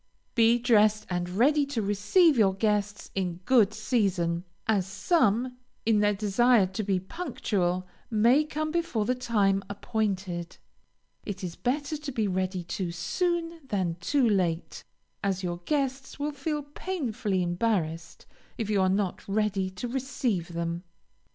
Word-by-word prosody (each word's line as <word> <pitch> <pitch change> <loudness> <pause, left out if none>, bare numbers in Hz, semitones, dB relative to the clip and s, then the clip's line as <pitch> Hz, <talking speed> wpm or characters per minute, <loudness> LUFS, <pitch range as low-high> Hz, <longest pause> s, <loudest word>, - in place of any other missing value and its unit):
Be 230 0 +5
dressed 215 -3 +3
and 175 0 -1
ready 275 +11 +3
to 280 -4 -2
receive 210 - +4
your 200 -5 +3
guests 205 0 -1
in 185 -3 -1
good 230 -6 +5
season, 195 -7 0 0.2
as 200 -4 +1
some, 250 - +1 0.3
in 220 -2 +4
their 205 0 +3
desire 215 +2 +4
to 190 +3 -4
be 195 -3 0
punctual, 190 - -2 0.2
may 235 +7 +4
come 310 0 -3
before 330 -11 0
the 250 - +2
time 210 -6 +1
appointed. 195 -5 -3 0.7
It 195 -2 -6
is 175 -2 -4
better 285 +4 -1
to 295 -1 -6
be 220 -4 0
ready 185 -1 -1
too 175 +1 -3
soon, 340 - -1
than 185 -7 0
too 260 +8 +2
late, 180 -5 0 0.4
as 195 -1 -1
your 175 -1 -2
guests 270 -2 -1
will 290 +1 -2
feel 295 +1 -3
painfully 245 - -2
embarrassed 175 -3 -1 0.3
if 220 -2 -2
you 200 -2 +3
are 185 - +3
not 195 -1 -1
ready 200 -2 0
to 185 +6 -5
receive 240 -9 -2
them. 170 0 -2
210 Hz, 145 wpm, -28 LUFS, 185-255 Hz, 0.7 s, Be